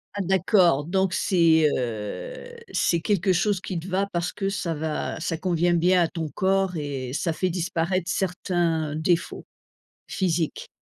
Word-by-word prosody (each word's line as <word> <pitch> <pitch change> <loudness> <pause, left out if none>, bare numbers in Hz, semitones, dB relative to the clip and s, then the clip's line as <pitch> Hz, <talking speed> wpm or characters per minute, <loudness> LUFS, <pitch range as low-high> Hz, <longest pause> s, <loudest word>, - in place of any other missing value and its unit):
Ah 200 - -1
d'accord, 180 -5 +3
donc 190 +2 +1
c'est, 165 -4 +3
heu, 130 - -5 0.2
c'est 170 -1 +1
quelque 195 0 +1
chose 195 +2 +1
qui 180 -3 -4
te 175 - -9
va 190 +2 0
parce 170 0 -1
que 195 -1 -3
ça 185 -4 -2
va 155 0 -3
ça 165 0 -2
convient 175 -1 +1
bien 175 +1 +4
à - - +1
ton 160 -2 -4
corps 190 0 +1
et 135 -4 -4
ça 160 +3 -1
fait 185 +3 -1
disparaître 175 +1 -1
certains 175 -5 -1
défauts 170 +2 0 0.7
physiques. 170 -4 -1
175 Hz, 155 wpm, -25 LUFS, 160-190 Hz, 0.7 s, bien